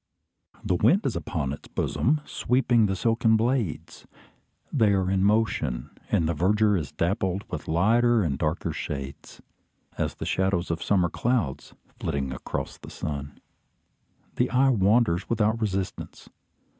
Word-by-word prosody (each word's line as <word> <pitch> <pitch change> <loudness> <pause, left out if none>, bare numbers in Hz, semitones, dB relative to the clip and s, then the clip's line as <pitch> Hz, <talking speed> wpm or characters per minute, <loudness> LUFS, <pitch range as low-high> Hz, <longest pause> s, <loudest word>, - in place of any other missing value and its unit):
The - - 0
wind 185 - +3
is - - 0
upon 70 -6 -2
its - - -10
bosom, 150 +4 0
sweeping 120 -3 +2
the 95 - -1
silken 115 +1 +2
blades. 110 - -2 0.7
They 110 -7 +4
are 95 -1 +1
in 95 -1 +2
motion; 95 - 0 0.2
and 80 - +2
the 85 - 0
verdure 105 +6 +2
is 80 -6 -3
dappled 95 +2 -1
into - - -5
lighter 115 +7 +3
and 75 -5 0
darker 75 +4 -2
shades, 70 -2 -7 0.6
as - - -1
the - - -6
shadows 95 -2 0
of 85 0 -3
summer 90 -3 +2
clouds 115 - -1 0.2
flitting 70 -2 -2
across 65 - -5
the - - -11
sun. 70 -1 -6 1.0
The 125 - +2
eye 135 +2 +3
wanders 105 -4 +2
without 110 0 +1
resistance. 95 -3 -4
95 Hz, 140 wpm, -26 LUFS, 85-115 Hz, 1.0 s, They